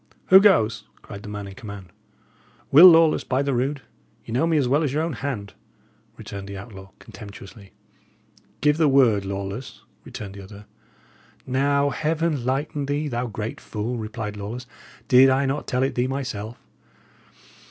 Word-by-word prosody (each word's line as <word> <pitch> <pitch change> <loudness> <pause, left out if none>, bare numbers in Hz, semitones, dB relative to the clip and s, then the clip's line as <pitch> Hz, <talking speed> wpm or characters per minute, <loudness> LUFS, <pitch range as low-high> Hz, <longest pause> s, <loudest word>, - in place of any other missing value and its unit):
"Who 190 - +10
goes?" 140 - +3 0.2
cried 100 - -9
the 105 - -9
man 105 -1 -6
in 100 - -9
command. 100 -3 -10 0.8
"Will 165 +7 +10
Lawless, 165 -2 +5
by 130 +2 0
the 140 -1 -1
rood 135 +3 -2 0.4
ye - - -9
know 130 +8 +1
me 165 -2 +2
as 135 -4 +1
well 140 +5 +2
as 150 -5 0
your 150 +3 0
own 165 -1 -2
hand," 115 -6 -5 0.6
returned 100 0 -8
the 100 0 -7
outlaw, 95 -1 -11
contemptuously. 100 -1 -13 0.9
"Give 150 +2 +3
the 160 -2 +3
word, 120 -8 +3
Lawless," 100 +5 -6 0.2
returned 100 -2 -8
the 100 - -10
other. 100 +1 -13 0.8
"Now, 140 +2 +1
Heaven 155 -1 -1
lighten 140 +2 -2
thee, 145 +1 -2
thou 120 0 -2
great 110 0 -6
fool," 110 +3 -4
replied 110 -1 -5
Lawless. 110 +5 -6 0.4
"Did 130 0 +7
I 135 +1 +2
not 135 +2 -2
tell 125 0 0
it 135 - 0
thee 125 +1 0
myself? 120 -5 -5
125 Hz, 165 wpm, -23 LUFS, 105-140 Hz, 0.9 s, Who